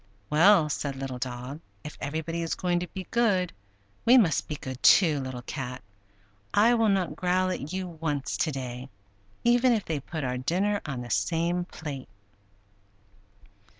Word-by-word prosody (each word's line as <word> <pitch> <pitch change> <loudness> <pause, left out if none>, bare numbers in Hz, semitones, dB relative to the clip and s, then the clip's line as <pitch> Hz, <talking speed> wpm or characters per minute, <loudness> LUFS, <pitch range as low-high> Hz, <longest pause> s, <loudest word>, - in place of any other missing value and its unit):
"Well," 165 +1 +6
said 145 -2 -3
Little 135 -2 -5
Dog; 125 +3 -5 0.2
"if 150 - -8
everybody 160 +3 -3
is 165 - -2
going 175 -1 0
to 180 - -4
be 190 0 -7
good 195 -7 +2 0.5
we 245 +3 +7
must 195 -10 +3
be 150 - -3
good, 130 -2 -7
too. 160 -7 +6
Little 130 -2 -5
Cat, 125 -3 -5 0.7
I 225 +4 +6
will 225 -2 +3
not 185 -6 +1
growl 185 +2 +1
at 150 -3 -4
you 185 0 -3
once 155 -5 -3
to 160 - +1
day, 130 -1 -6 0.5
even 245 +1 +4
if 215 -3 -1
they 160 -3 -2
put 155 +3 -5
our 125 -1 -2
dinner 195 +9 0
on 135 -4 -4
the 120 -1 -7
same 170 - 0
plate!" 145 - -7
160 Hz, 160 wpm, -27 LUFS, 135-185 Hz, 0.7 s, we